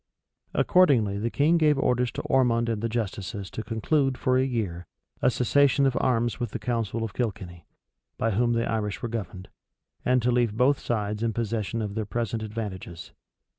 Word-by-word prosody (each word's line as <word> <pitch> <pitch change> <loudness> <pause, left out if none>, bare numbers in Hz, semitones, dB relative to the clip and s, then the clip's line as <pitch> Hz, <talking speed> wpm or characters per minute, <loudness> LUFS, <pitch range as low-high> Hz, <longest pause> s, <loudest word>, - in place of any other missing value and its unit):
Accordingly 120 - +3
the 115 +3 -1
king 155 +7 +3
gave 150 -2 +4
orders[] 125 -3 +1
to - - -4
Ormond 120 -3 +2
and 110 -2 -2
the 115 - -1
justices 105 -3 -4
to - - -4
conclude, 130 +5 0
for 130 - +1
a 130 - +3
year, 100 - -3 0.3
a - - +4
cessation 140 +3 +3
of 135 -2 +2
arms 120 -1 +1
with 120 -3 -2
the 120 - -4
council 115 0 -2
of 110 -3 -4
Kilkenny, 95 -8 -4 0.5
by 115 - 0
whom 120 +3 +2
the 115 0 0
Irish 105 -3 -2
were 120 - -2
governed, 100 -4 -5 0.6
and 125 0 +3
to 125 - +2
leave 120 -3 +1
both 130 +3 +3
sides 105 -2 -2
in 115 -1 0
possession 115 0 -2
of 105 -1 -4
their 110 -1 -3
present 115 -1 -2
advantages. 105 -6 -6
115 Hz, 180 wpm, -26 LUFS, 105-125 Hz, 0.6 s, gave